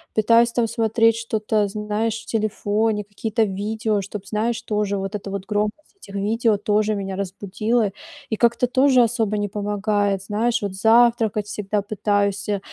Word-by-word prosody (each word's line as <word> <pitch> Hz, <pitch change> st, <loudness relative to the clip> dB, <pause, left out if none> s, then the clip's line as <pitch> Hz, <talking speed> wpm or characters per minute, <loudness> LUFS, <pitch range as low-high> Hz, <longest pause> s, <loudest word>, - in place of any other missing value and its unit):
пытаюсь 230 Hz, +2 st, +4 dB
там 235 Hz, -2 st, +1 dB
смотреть 225 Hz, 0 st, +2 dB
что-то, 215 Hz, -2 st, 0 dB
знаешь, 215 Hz, +2 st, -2 dB
в -, -, -16 dB
телефоне, 215 Hz, 0 st, 0 dB
какие-то 220 Hz, +2 st, -1 dB
видео, 215 Hz, +2 st, -1 dB
чтоб, 200 Hz, 0 st, -7 dB
знаешь, 225 Hz, +2 st, -1 dB
тоже, 210 Hz, -3 st, -1 dB
вот 195 Hz, +2 st, -4 dB
эта 200 Hz, -1 st, -5 dB
вот, 195 Hz, -1 st, -4 dB
громкость 210 Hz, -, -3 dB
этих 200 Hz, -, -12 dB
видео, 215 Hz, +2 st, +1 dB
тоже, 210 Hz, +1 st, +1 dB
меня 195 Hz, -1 st, -4 dB
разбудила, 200 Hz, +3 st, -1 dB, 0.4 s
и 220 Hz, -, 0 dB
как-то, 235 Hz, +2 st, +2 dB
тоже, 260 Hz, 0 st, +4 dB
особо 225 Hz, -2 st, 0 dB
не 205 Hz, 0 st, -1 dB
помогает. 205 Hz, -1 st, -1 dB
Знаешь, 230 Hz, +4 st, 0 dB
вот 200 Hz, -2 st, -3 dB
завтракать 225 Hz, 0 st, +3 dB
всегда 210 Hz, -1 st, -2 dB
пытаюсь, 205 Hz, -1 st, -1 dB
э, 205 Hz, -, 0 dB
210 Hz, 155 wpm, -22 LUFS, 205-225 Hz, 0.4 s, пытаюсь